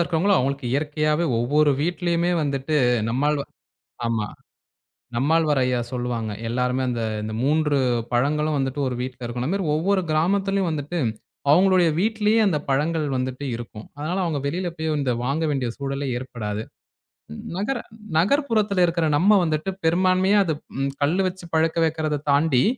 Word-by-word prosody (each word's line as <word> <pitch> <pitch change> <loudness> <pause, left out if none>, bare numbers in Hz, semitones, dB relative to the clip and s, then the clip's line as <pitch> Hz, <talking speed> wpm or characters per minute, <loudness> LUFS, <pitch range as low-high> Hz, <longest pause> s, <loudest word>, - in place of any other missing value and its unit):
இருக்கிறவங்களுக்கு 175 +2 +2
அவங்களுக்கு 135 0 -2
இயற்கையாவே 150 +3 0
ஒவ்வொரு 145 +5 +3
வீட்டிலயுமே 175 +1 0
வந்துட்டு 140 +1 -1 0.3
நம்மாழ்வார் 140 +4 0 0.6
ஆமா, 110 -2 -1 0.9
நம்மாழ்வார் 150 +2 +2
ஐயா 125 -1 +1
சொல்லுவாங்க. 120 -3 -3 0.2
எல்லாருமே 125 +2 0
அந்த 120 -1 -2 0.2
இந்த 110 - -4
3 150 0 +2 0.4
பழங்களும் 150 +4 +1
வந்துட்டு 135 +1 -2
ஒரு 125 - -2
வீட்ல 125 0 -6
இருக்கணும். 120 +2 -3
அது - - 0
மாரி 190 -5 -2
ஒவ்வொரு 190 +5 +1
கிராமத்திலயும் 195 +3 +1
வந்துட்டு 155 +3 -3 0.5
அவங்களுடைய 180 +1 +5
வீட்லயே 220 +1 +2
அந்தப் 150 -6 -1
பழங்கள் 150 +3 +1
வந்துட்டு 130 +2 -3
இருக்கும். 115 -2 -9
அதனால 165 +6 -2
அவங்க 155 -4 -1
வெளியில 175 +4 -2
போயி 160 0 -3
இந்த 130 -3 0
வாங்க 145 +5 0
வேண்டிய 130 -4 -1
சூழலே 140 0 -3
ஏற்படாது. 110 -4 -5 0.9
நகர 230 +7 -1 0.4
நகர்ப்புறத்துல 215 - +2
இருக்கிற 170 -1 0
நம்ம 200 +4 +5
வந்துட்டு 155 +2 -1 0.2
பெரும்பான்மையா 185 +4 +3
அது 160 - 0 0.5
கல்லு 160 +7 +2
வச்சு 185 -1 -6
பழக்க 160 +1 +2
வெக்கிறத 155 -2 -1
தாண்டி 140 -3 +3
155 Hz, 135 wpm, -23 LUFS, 135-175 Hz, 0.9 s, அவங்களுடைய